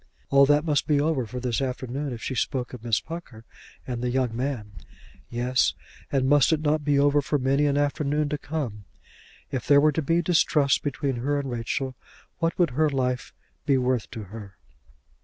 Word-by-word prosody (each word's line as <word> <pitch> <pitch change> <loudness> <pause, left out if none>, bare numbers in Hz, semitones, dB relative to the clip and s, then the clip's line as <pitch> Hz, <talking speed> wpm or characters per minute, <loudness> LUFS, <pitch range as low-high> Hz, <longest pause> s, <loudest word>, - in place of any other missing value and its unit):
All 140 0 +6
that 145 +2 +3
must 150 -3 +1
be 150 -2 +3
over 145 -5 0
for 125 +3 -5
this 125 0 -1
afternoon 130 +2 -3
if 115 -2 -7
she - - -2
spoke 125 +1 -2
of 120 -3 -9
Miss 115 -3 +2
Pucker 150 -10 -9 0.4
and 120 -2 -4
the 125 - -1
young 125 -2 0
man. 125 -5 -3 0.6
Yes; 125 +2 +1 0.4
and 135 -2 +1
must 145 0 +5
it 160 - +2
not 155 0 +1
be 145 -1 +2
over 145 +1 +4
for 145 +1 0
many 140 +2 +2
an 140 0 +1
afternoon 145 +1 0
to 150 - -2
come? 130 -10 -4 0.7
If 130 -4 -3
there 140 0 +7
were 150 +1 +4
to 160 - -1
be 165 +3 +1
distrust 155 -5 +3
between 140 -2 -2
her 145 +4 0
and 135 -2 -4
Rachel 125 +3 -3 0.4
what 165 0 0
would 175 -6 +2
her 155 +4 +2
life 125 -2 -1 0.4
be 140 -2 +4
worth 125 -2 0
to 115 -3 -7
her? 100 -1 -10
135 Hz, 195 wpm, -25 LUFS, 125-145 Hz, 0.7 s, there